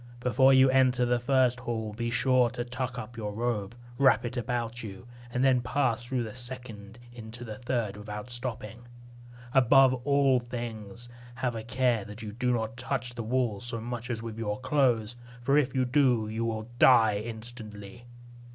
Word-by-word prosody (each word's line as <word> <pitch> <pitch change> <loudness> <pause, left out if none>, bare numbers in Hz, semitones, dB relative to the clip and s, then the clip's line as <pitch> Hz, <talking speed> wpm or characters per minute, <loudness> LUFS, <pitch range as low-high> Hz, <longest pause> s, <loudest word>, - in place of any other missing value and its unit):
Before 130 +2 +4
you 130 0 +7
enter 130 -2 +3
the 120 0 +1
first 125 0 +2
hall, 110 -3 -4
be 120 +2 -3
sure 125 0 +3
to 120 +1 -5
tuck 125 +1 -4
up 120 0 -7
your 105 -2 -4
robe, 115 -1 -2 0.2
wrap 135 -2 +4
it 120 +1 -4
about 120 0 -3
you, 100 +1 -9 0.2
and 125 +2 -1
then 130 -2 +4
pass 125 -3 0
through 120 0 -2
the 110 -2 -7
second 120 -4 -8 0.2
into 115 0 -9
the 110 -2 -8
third 120 -5 -2
without 105 +3 -7
stopping. 120 -1 -5 0.7
Above 135 0 +6
all 140 -2 +3
things, 120 -2 -7 0.3
have 125 0 -1
a 115 - -4
care 120 -1 0
that 105 +2 -9
you 105 - -5
do 125 +3 -1
not 115 -1 -2
touch 125 -1 -3
the 120 - -5
walls 115 -3 -1
so 120 -1 -2
much 120 +1 -5
as 115 -2 -3
with 115 -1 -6
your 105 -2 -2
clothes; 120 -5 +1 0.3
for 135 +3 +2
if 140 -3 +2
you 130 -1 +2
do, 125 -4 +2
you 110 +2 -2
will 110 -1 -3
die 110 -5 +6
instantly. 110 -1 -8
120 Hz, 180 wpm, -28 LUFS, 110-125 Hz, 0.7 s, you